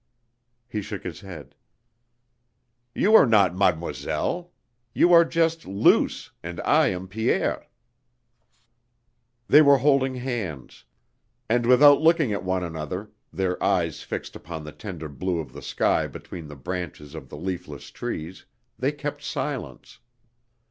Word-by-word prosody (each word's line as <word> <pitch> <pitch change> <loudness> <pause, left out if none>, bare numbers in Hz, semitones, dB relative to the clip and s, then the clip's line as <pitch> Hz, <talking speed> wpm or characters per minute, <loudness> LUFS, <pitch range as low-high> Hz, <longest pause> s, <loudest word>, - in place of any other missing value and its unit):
(He 110 -3 -4
shook 100 -1 -7
his 90 -1 -6
head.) 90 -8 -11 1.4
"You 215 - +2
are 220 - +8
not 100 -5 +4
'Mademoiselle.' 95 - -1 0.4
You 175 - +5
are 170 0 +9
just 165 -1 0
Luce 100 +2 +2
and 85 0 -7
I - - +3
am 95 0 -3
Pierre." 110 +4 -1 1.8
They 150 - +8
were 140 -2 +6
holding 135 -1 +2
hands; 115 - -5 0.6
and 120 +1 +1
without 140 +4 +7
looking 160 -7 +3
at 100 - -3
one 95 -1 -1
another, 85 +5 -5 0.2
their 90 +1 -2
eyes - - 0
fixed - - -6
upon 80 -2 -8
the 75 - -8
tender 85 -4 -7
blue 85 +5 -3
of 70 -6 -7
the - - -9
sky - - 0
between 85 -3 -9
the 75 - -10
branches 80 -1 -6
of 75 -5 -9
the - - -9
leafless 90 -4 -6
trees, 80 +4 -6 0.3
they 135 +3 +1
kept 145 0 -6
silence. 135 -2 -5
95 Hz, 135 wpm, -25 LUFS, 85-135 Hz, 1.8 s, are